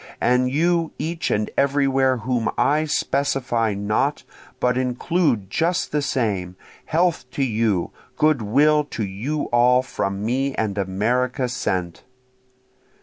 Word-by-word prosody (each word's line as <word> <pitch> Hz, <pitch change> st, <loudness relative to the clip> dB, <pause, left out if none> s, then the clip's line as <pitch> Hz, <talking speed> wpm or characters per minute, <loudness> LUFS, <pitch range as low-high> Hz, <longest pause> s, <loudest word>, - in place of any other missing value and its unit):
And 125 Hz, +1 st, +2 dB
you 165 Hz, +3 st, +1 dB
each 165 Hz, +3 st, -3 dB
and 105 Hz, 0 st, 0 dB
everywhere 135 Hz, -2 st, +2 dB
whom 115 Hz, -1 st, -1 dB
I 150 Hz, +2 st, +2 dB
specify 135 Hz, -7 st, 0 dB
not, 100 Hz, +1 st, -1 dB, 0.4 s
but 125 Hz, 0 st, +1 dB
include 125 Hz, -, 0 dB
just 170 Hz, -, 0 dB
the 150 Hz, -, 0 dB
same! 100 Hz, -10 st, -1 dB, 0.3 s
Health 165 Hz, -5 st, 0 dB
to 140 Hz, -, 0 dB
you! 110 Hz, -7 st, 0 dB, 0.3 s
good 155 Hz, -4 st, +3 dB
will 150 Hz, +8 st, +3 dB
to 115 Hz, -6 st, -4 dB
you 120 Hz, +11 st, -3 dB
all, 125 Hz, +1 st, +4 dB
from 100 Hz, -5 st, -3 dB
me 135 Hz, +4 st, 0 dB
and 105 Hz, -3 st, -1 dB
America 120 Hz, +7 st, 0 dB
sent! 90 Hz, -8 st, -3 dB
125 Hz, 125 wpm, -22 LUFS, 110-145 Hz, 0.4 s, all